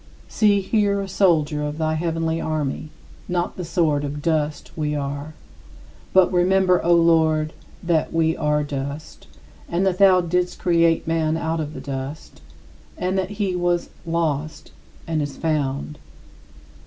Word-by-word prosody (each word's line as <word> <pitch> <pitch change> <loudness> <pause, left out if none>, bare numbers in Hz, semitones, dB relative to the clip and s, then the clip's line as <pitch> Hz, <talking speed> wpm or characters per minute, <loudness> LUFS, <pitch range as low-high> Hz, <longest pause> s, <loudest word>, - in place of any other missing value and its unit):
" - - -24
See 205 -2 +3
here 200 0 +1
a 195 - -3
soldier 160 -6 +2
of 150 0 -3
the 155 -1 0
heavenly 165 0 -1
army; 155 -1 -2 0.4
not 175 0 -1
the 180 - -5
sort 160 -4 +1
of 145 +1 -4
dust 155 -2 -1
we 150 -2 -1
are. 145 +2 -4 0.8
But 190 -1 +4
remember, 180 0 +3
O 175 - +2
Lord, 160 -2 +3 0.3
"that 170 -2 +1
we 160 0 +1
are 150 0 +1
dust" 140 +1 -6 0.4
and 175 +3 0
that 185 -1 0
thou 190 -2 +6
didst 180 +1 -1
create 170 -2 +2
man 160 -1 +1
out 165 0 -2
of 155 -1 -4
the 130 - -6
dust, 135 - -7 0.6
and 185 +1 -1
that 190 -1 -1
he 195 -4 0
"was 175 -1 0
lost, 160 -3 -2 0.3
and 160 -2 -1
is 145 -2 -4
found." 150 -2 -2
160 Hz, 150 wpm, -22 LUFS, 150-180 Hz, 0.8 s, thou